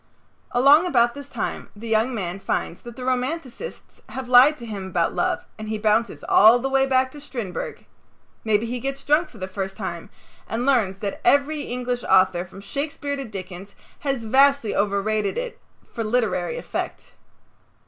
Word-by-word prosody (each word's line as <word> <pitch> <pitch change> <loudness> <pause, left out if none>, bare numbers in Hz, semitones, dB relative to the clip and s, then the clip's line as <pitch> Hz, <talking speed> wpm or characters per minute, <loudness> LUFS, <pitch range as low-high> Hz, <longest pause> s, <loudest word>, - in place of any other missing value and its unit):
Along 280 +8 +5
about 240 -7 +3
this 285 0 -9
time - - -4
the 220 +3 -8
young 225 +3 +1
man 185 -2 -3
finds 175 -2 -3
that 240 -1 -10
the 250 - -7
romanticists 260 - -4
have 260 -1 -6
lied 255 +5 +7
to 235 - -9
him 200 -4 -5
about - - 0
love - - -1
and 215 0 -6
he 220 - -1
bounces 215 +2 +1
all 220 +3 +7
the 270 +2 -3
way 270 0 +3
back 260 -1 +2
to 295 - -11
Strindberg. 225 - -6 0.6
Maybe 220 0 +2
he 245 +2 -3
gets 275 +2 -4
drunk 300 +5 +2
for 230 - -15
the 185 -2 -5
first 190 0 -5
time 175 -5 -5 0.4
and 235 +2 -2
learns 225 -9 +2
that 200 0 -5
every 290 +2 +3
English 245 -2 -3
author 185 -2 +4
from 190 +2 -12
Shakespeare 285 +5 -3
to 275 -1 -5
Dickens 190 -2 -8 0.2
has 275 -4 -2
vastly 270 0 +3
overrated 205 - 0
it - - -4 0.3
for 230 - -2
literary 215 -7 0
effect. - - -5
235 Hz, 170 wpm, -23 LUFS, 205-270 Hz, 0.6 s, lied